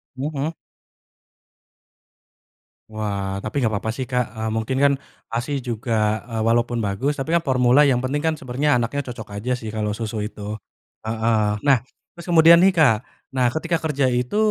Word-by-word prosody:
Mhm. 145 +3 -3 2.4
Wah, 100 -2 -3
tapi 110 +7 -4
gapapa 110 0 -1
sih 130 +4 -3
Kak, 125 -1 0
eee, 110 0 -2
mungkin 115 +4 -1
kan 140 0 +5 0.4
ASI 125 +5 -1
juga, 110 -2 0
eee, 115 -1 -2
walaupun 120 +1 +2
bagus, 130 +9 -1
tapi 145 +4 -2
kan 170 - +4
formula, 130 -2 +4
yang 140 -4 +4
penting 130 +4 -1
kan, 160 0 +1
sebenernya 135 +1 +1
anaknya 125 +4 -1
cocok 115 -3 -7
aja 125 +4 -2
sih, 110 -3 -7
kalau 105 -1 -1
susu 110 -1 -3
itu, 105 0 -5 0.5
heeh. 110 -1 +1 0.2
Nah, 135 -2 +6 0.4
terus 170 -1 -11
kemudian 170 0 +7
nih, 190 - +7
Kak. 140 -9 +5 0.4
Nah, 125 -2 +2
ketika 165 +5 -2
kerja 145 -4 0
itu, 125 +7 0
125 Hz, 155 wpm, -22 LUFS, 110-145 Hz, 2.4 s, kemudian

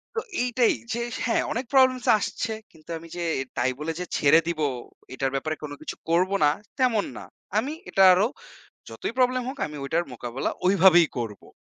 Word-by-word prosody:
তো 450 - +1 0.2
এইটাই 245 -1 +2 0.2
যে 235 - -2 0.3
হ্যাঁ, 230 - +1
অনেক 250 +3 -2
প্রবলেমস 260 -2 +4
আসছে। 225 +2 -3 0.2
কিন্তু 160 -1 -21
আমি 165 +1 -11
যে 175 - -2 0.3
তাই 130 +1 +2
বলে 155 +2 -2 0.3
ছেড়ে 150 +3 +6
দিবো, 160 -3 0 0.5
এটার 135 +1 -1
ব্যাপারে 155 +3 -2
কোন 150 - -5
কিছু - - -6
করব 175 +3 +3
না 145 - +6 0.3
তেমন 240 -5 +2
না। - - -8 0.3
আমি 265 +8 0 0.2
এটা 195 - +4
আরও 190 +4 +3 0.6
যতই - - -4
প্রবলেম 255 0 +3
হোক, 265 +2 -5
আমি 150 0 -8
ওটার 165 +5 0
মোকাবেলা 120 +2 -3 0.2
ওই 185 - +5
ভাবেই 175 -3 +7
করবো। 110 -4 -5
175 Hz, 175 wpm, -25 LUFS, 150-240 Hz, 0.6 s, ভাবেই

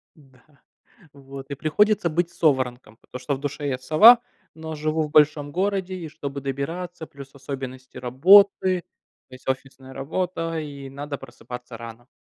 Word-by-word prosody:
Да. 135 -4 -23 0.7
Вот. 135 0 -11
И - - -2
приходится 195 +5 +2
быть 170 +2 0
соворонком, 130 -7 0
потому 125 - -10
что 140 +2 -1
в - - -9
душе 145 0 -4
я 130 -2 -1
сова, 185 - +8 0.4
но 160 0 -7
живу 155 +1 -1
в 150 - -6
большом 150 -1 +3
городе 190 +1 -1
и 170 -3 -6
чтобы 140 -2 -6
добираться, 160 +6 -5
плюс 140 0 -13
особенности 130 -1 -8
работы. 185 +8 +5 0.5
То 130 - -11
есть 130 - -18
офисная 130 0 -5
работа 165 +2 -3
и 140 -3 -8
надо 140 +1 -6
просыпаться 125 -1 -10
рано. 115 +1 -11
145 Hz, 150 wpm, -24 LUFS, 130-165 Hz, 0.7 s, сова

